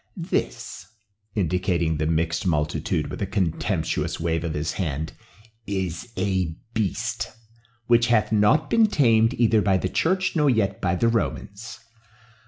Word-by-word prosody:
This," 90 - -3 0.5
indicating 85 -4 0
the 75 0 0
mixed 80 +2 0
multitude 75 -3 -1
with - - -6
a 100 - 0
contemptuous 95 -5 -1
wave 80 0 -1
of 80 -2 -3
his 75 +1 -1
hand, 80 -4 -3 0.5
"is 95 +1 -3
a 95 -4 0 0.2
beast, 115 +3 -2 0.5
which 120 0 +4
hath 115 -3 +2
not 105 +8 +3
been 225 -1 +4
tamed 115 - +3
either 115 -2 +3
by 95 -2 +3
the 95 - -2
church 185 - 0
nor 150 -3 +3
yet 100 -5 +1
by 90 -1 +1
the 115 - +2
Romans. 110 -1 -3
100 Hz, 140 wpm, -24 LUFS, 85-115 Hz, 0.5 s, which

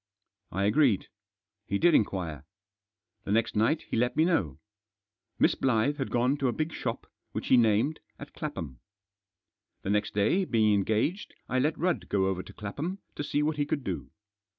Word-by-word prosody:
I 100 - -1
agreed. 120 -2 +3 0.6
He 100 - 0
did 175 +9 +4
inquire. 85 - 0 0.8
The - - -4
next 115 +2 +1
night 115 +9 +2
he - - -5
let 120 +2 +1
me 160 - +5
know. 95 - +1 0.8
Miss - - +4
Blyth 130 +3 +1
had 135 - -2
gone 125 +4 +2
to 140 -2 0
a - - +2
big 155 +5 -2
shop, - - -4 0.3
which - - -4
he - - +7
named, 115 +6 +3 0.2
at - - -10
Clapham. 65 -6 -5 1.0
The 95 - -1
next 105 0 0
day, 110 - +3
being 110 - +3
en 100 -1 +2
gaged, 150 - -1
I 130 - 0
let 150 +4 +1
Rudd 175 +2 -1
go 95 -2 +2
over 95 -1 -1
to - - -12
Clapham 145 - -4 0.2
to - - -4
see 145 +1 0
what 155 0 0
he 145 - +1
could 145 -2 -1
do. - - -4
120 Hz, 180 wpm, -29 LUFS, 100-150 Hz, 1.0 s, he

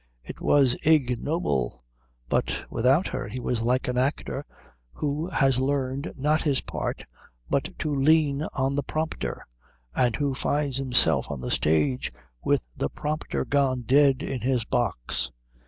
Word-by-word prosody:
It - - -9
was 135 -4 +4
ignoble, 125 - +1 0.4
but - - -1
without 130 +9 +3
her - - -4
he 120 +5 -5
was 120 -1 -1
like 125 +3 +1
an 125 0 0
actor 135 +1 -1 0.5
who 150 +4 -2
has 135 -7 +2
learned 135 0 -1
not 150 +3 +2
his 140 -4 +2
part - - -4 0.5
but - - -1
to 150 - -2
lean 145 0 +3
on 135 0 +1
the 145 - 0
prompter, 155 +3 -3 0.5
and 120 - +2
who 140 +2 0
finds 140 0 -1
himself 130 -2 +3
on 70 - -4
the 60 0 -4
stage 75 -4 +1 0.3
with - - +2
the 70 - -1
prompter 150 0 -3
gone 135 -3 +1
dead 135 +2 +4
in 130 -3 -3
his 125 -2 +1
box. 80 - -1
135 Hz, 145 wpm, -26 LUFS, 120-145 Hz, 0.5 s, was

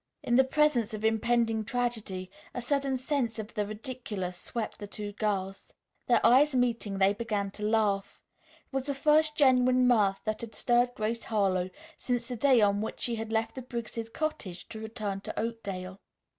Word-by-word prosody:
In 240 - +1
the 265 - +7
presence 260 -5 +2
of 215 +1 -4
impending 225 0 +2
tragedy 215 -6 -3 0.2
a - - -1
sudden 275 0 0
sense 255 -4 -1
of 220 0 -6
the 210 -2 -1
ridiculous 210 -4 -5
swept 220 +5 -5
the 205 - -6
two 205 0 -5
girls. 195 -2 -2 0.4
Their 235 -2 +4
eyes 265 +4 +6
meeting, 235 -5 0
they 195 +1 +4
began 205 -2 -2
to 210 - -8
laugh. 210 -3 +1 0.5
It - - -43
was 270 -1 -1
the 280 - -1
first 300 +2 +3
genuine 255 -2 +5
mirth 205 -5 +3
that 215 -1 -2
had 230 -1 -8
stirred 245 0 +2
Grace 220 +2 -2
Harlowe 190 -4 +1 0.3
since 245 -2 -1
the 250 - -3
day 255 0 +4
on 205 0 +3
which 220 - -4
she 235 -2 0
had 225 0 -5
left 225 0 0
the 260 - -6
Briggs' 235 -2 -5
cottage 225 - -4
to 220 - -7
return 215 -3 -4
to - - -5
Oakdale. 200 -4 -4
225 Hz, 180 wpm, -29 LUFS, 205-245 Hz, 0.5 s, the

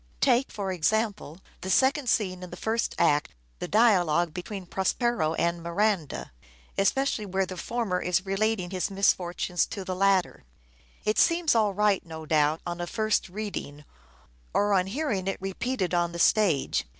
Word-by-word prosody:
Take, 245 - +3
for 195 -2 -4
example, 195 -1 -1 0.2
the 190 - -5
second 265 +5 +3
scene 185 -4 0
in 180 - -8
the 180 - -9
first 225 +4 -1
act, 145 - +2 0.2
the - - -4
dialogue 175 -7 +3
between 185 +2 -6
Prospero 190 -2 0
and 170 +1 0
Miranda, 170 -1 -1 0.4
especially 215 +1 +1
where 190 0 0
the 185 - -7
former 200 -1 -2
is 180 +2 0
relating 195 -1 -1
his 185 -2 -1
misfortunes 180 -2 +1
to 195 - -6
the 185 - -3
latter. 195 -1 +1 0.6
It 215 - +1
seems 335 -1 +3
all 215 -4 +2
right, 210 -1 +2
no 160 -2 -9
doubt, 155 0 +2
on 175 0 -4
a 175 - -3
first 215 -1 0
reading, 175 -7 -6 0.7
or 205 0 +3
on 185 -1 +2
hearing 215 -5 -2
it 195 - -1
repeated 195 +1 -2
on 175 -1 +1
the - - -5
stage. 170 - +2
190 Hz, 160 wpm, -27 LUFS, 175-215 Hz, 0.7 s, Take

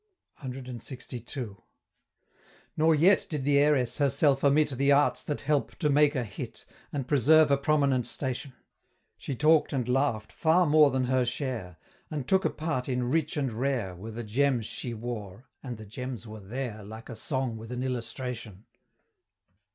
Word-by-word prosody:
CLXII. 125 -3 -6 1.2
Nor 160 +1 +4
yet 180 +6 +4
did 150 -4 -3
the 140 +1 +4
Heiress 145 -4 +2
herself 140 0 +2
omit 145 +1 +4
The 140 +2 +2
arts 145 +1 +3
that 150 - -4
help 145 0 0
to 150 -4 0
make 150 +1 +4
a 125 - 0
hit, 105 -4 -8 0.3
And 135 -3 -3
preserve 150 +2 +5
a 140 - +5
prominent 140 -4 +2
station. 130 +1 -4 0.6
She 135 - -5
talk'd 155 +3 +4
and 125 -3 -1
laugh'd 125 -4 0
far 170 +3 +3
more 150 -1 +6
than 130 -1 0
her 130 0 +2
share; 120 - -3 0.3
And 145 -5 -4
took 190 +3 +3
a - - +4
part 150 -5 -3
in 125 -1 -1
"Rich 160 0 0
and 135 -5 -1
Rare 120 -6 -1
Were 100 +6 -8
the 115 +2 -6
gems 125 +1 +1
she 120 +1 -5
wore" 110 -2 -6 0.2
and 125 -4 -6
the 110 - -10
gems 125 +3 -6
were 110 0 -9
there, 110 +1 -5
Like 110 +3 -10
a 115 - -7
Song 130 +1 -2
with 110 +1 -9
an 125 0 -3
Illustration. 120 -4 -5
130 Hz, 165 wpm, -28 LUFS, 115-145 Hz, 1.2 s, more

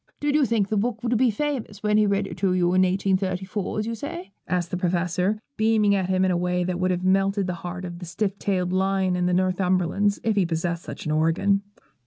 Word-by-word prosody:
'Did 290 0 0
you 295 -3 +3
think 220 -4 +1
the 215 - 0
book 220 +1 -1
would 240 0 +1
be 250 +2 +3
famous 230 -4 -3
when 210 0 +2
he 215 0 +4
read 200 0 +1
it - - -7
to 190 -2 +1
you 180 -1 +2
in 185 - +4
1834, 190 +1 -1
as 215 - -1
you 230 - -3
say?' 340 - -6 0.2
asked 180 -2 -1
the - - -1
Professor, 180 +2 0 0.2
beaming 220 -2 +3
at 190 -2 0
him 185 0 +2
in 185 - +2
a - - +1
way 180 0 0
that 180 0 -2
would 185 0 +1
have 180 0 -1
melted 195 +1 +2
the 180 - -2
heart 180 +1 -5
of 175 -1 -7
the 180 - -7
stiff 200 +3 -2
tailed 185 -2 -1
lion 190 -1 +1
of 180 0 0
the - - +1
Northumberlands, 185 +2 +1
if 220 -2 +1
he'd 190 -4 +3
possessed 170 +1 -1
such - - -8
an 155 - -1
organ. 165 +6 +2
190 Hz, 240 wpm, -24 LUFS, 180-210 Hz, 0.2 s, he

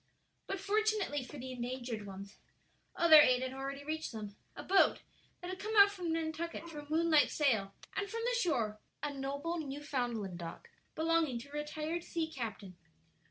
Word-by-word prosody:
But 390 - -3
fortunately 410 -7 +1
for 290 - -9
the 260 0 -6
endangered 240 -3 -4
ones, 195 +1 -9 0.6
other 315 -3 +9
aid 255 -2 +4
had 260 0 -3
already 275 +1 -5
reached 315 +2 -3
them 210 -2 -6 0.2
a - - -7
boat 390 0 +4 0.4
that 360 +1 -5
had 375 - -6
come 435 +2 -3
out 400 0 +9
from 360 -5 -3
Nantucket 325 +1 -3
for 320 -3 -7
a 290 0 -11
moonlight 320 -1 +4
sail, 220 -10 +1 0.2
and 400 0 -2
from 460 0 -3
the - - +1
shore 230 - 0 0.2
a 295 -1 -1
noble 280 +5 -3
Newfoundland 250 - -3
dog 170 -1 -7 0.3
belonging 320 -5 +2
to 280 - -12
a - - -18
retired 305 +3 -3
sea 335 -2 -2
captain. 215 - -6
295 Hz, 170 wpm, -34 LUFS, 250-335 Hz, 0.6 s, other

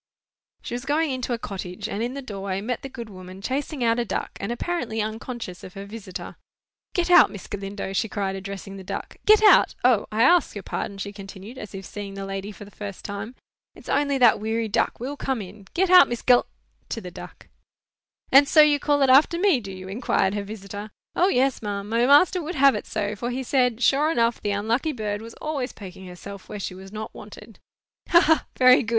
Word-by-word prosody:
She - - -6
was 245 0 -4
going 295 +2 +1
into 255 -1 -3
a 240 - 0
cottage, 185 -5 -6
and 205 - -4
in 245 +3 -2
the 280 - -6
doorway 195 -4 -4
met 230 +4 -3
the 270 - -7
good 235 -3 -8
woman 185 -2 -11
chasing 265 +5 -3
out 230 0 +2
a - - +1
duck, - - -3
and 200 - -3
apparently 240 -4 -2
unconscious 220 -3 -5
of 185 - -11
her 195 0 -7
visitor. 200 -3 -8 0.6
"Get 355 0 +1
out, 355 - +8
Miss 200 - -9
Galindo!" 195 -1 -5
she 215 +3 0
cried, 195 -2 -2
addressing 195 0 -7
the 190 - -9
duck. - - -6
"Get 430 0 +7
out! 420 - +6
O, 245 -5 +4
I 220 +2 +2
ask 345 0 +4
your 205 - -6
pardon," 200 - -4
she 200 +1 -5
continued, 200 +4 -10
as 210 -1 -8
if 195 0 -7
seeing 200 0 -7
the 195 0 -5
lady 195 +1 -5
for 205 0 -11
the 205 - -15
first 200 -2 -8
time. 205 +4 -6 0.4
"It's - - -13
only 280 0 +1
that 240 -5 +5
weary 220 +1 -1
duck 220 +2 0
will 265 +5 -4
come 265 -3 -2
in. 195 0 -10
Get 370 +1 +2
out 365 -1 +9
Miss 240 -1 -4
Gal——" 245 -1 +5 0.4
(to - - -3
the - - -8
duck). - - -11 0.8
"And 280 +1 +7
so 310 - +7
you 295 -1 +5
call 290 -1 +2
it 270 - +3
after 300 +5 +5
me, 360 -6 +3
do 200 -4 -8
you?" 185 0 -9
inquired 195 -1 0
her 205 - -2
visitor. 205 0 -8 0.3
"O, 360 - +4
yes, 270 -6 +2
ma'am; 205 -2 -4
my 230 +3 +2
master 350 +6 +5
would 335 +3 -5
have 275 0 +6
it 210 - -5
so, 205 +1 -2
for 235 +4 -4
he 255 +2 -3
said, 250 -2 +1
sure 290 +3 +4
enough 235 -5 +1
the 205 - -2
unlucky 225 +9 0
bird 210 -3 -3
was 230 +1 -10
always 285 -4 -3
poking 190 -2 -10
herself 190 +2 -10
where 210 - -6
she 185 -1 -4
was 190 +1 -11
not 215 0 -6
wanted." - - -12 0.5
"Ha, 340 - +7
ha! 320 -2 +3
very 255 0 +7
good! 225 - -5
225 Hz, 225 wpm, -24 LUFS, 200-270 Hz, 0.8 s, out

